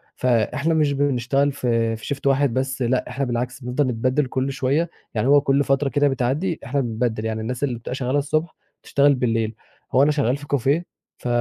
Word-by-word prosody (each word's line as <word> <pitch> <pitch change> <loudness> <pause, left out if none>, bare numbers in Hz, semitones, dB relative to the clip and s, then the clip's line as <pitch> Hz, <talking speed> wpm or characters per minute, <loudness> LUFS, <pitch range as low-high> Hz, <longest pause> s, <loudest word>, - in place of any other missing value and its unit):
فإحنا 130 +6 +1
مش 150 -3 +2
بنشتغل 140 0 +1
في 115 -4 0
في 125 +6 -4
Shift 140 - -17
واحد 135 -2 +3
بس 130 0 -2
لأ، 125 +1 0
إحنا 140 +1 -2
بالعكس 125 +1 -3
بنفضل 130 +3 0
نتبدِّل 130 +4 +1
كل 130 +1 -1
شوية، 140 +5 0 0.2
يعني 115 +3 0
هو 145 0 +6
كل 140 0 +2
فترة 135 +1 +1
كده 145 0 +2
بتعدّي 140 +7 -1
إحنا 140 +2 0
بنتبدِّل، 115 -2 -2
يعني 110 0 -2
الناس 125 +4 -4
اللي 130 -4 0
بتبقى 125 - -5
شغّالة 130 +2 0
الصبح 155 +3 -1 0.3
تشتغل 140 0 +3
بالليل. 115 -3 0 0.4
هو 130 +2 +5
أنا 150 - +4
شغّال 140 -3 +1
في 145 0 -11
كافيه، 145 +5 +1 0.3
ف - - -7
135 Hz, 195 wpm, -22 LUFS, 125-145 Hz, 0.4 s, هو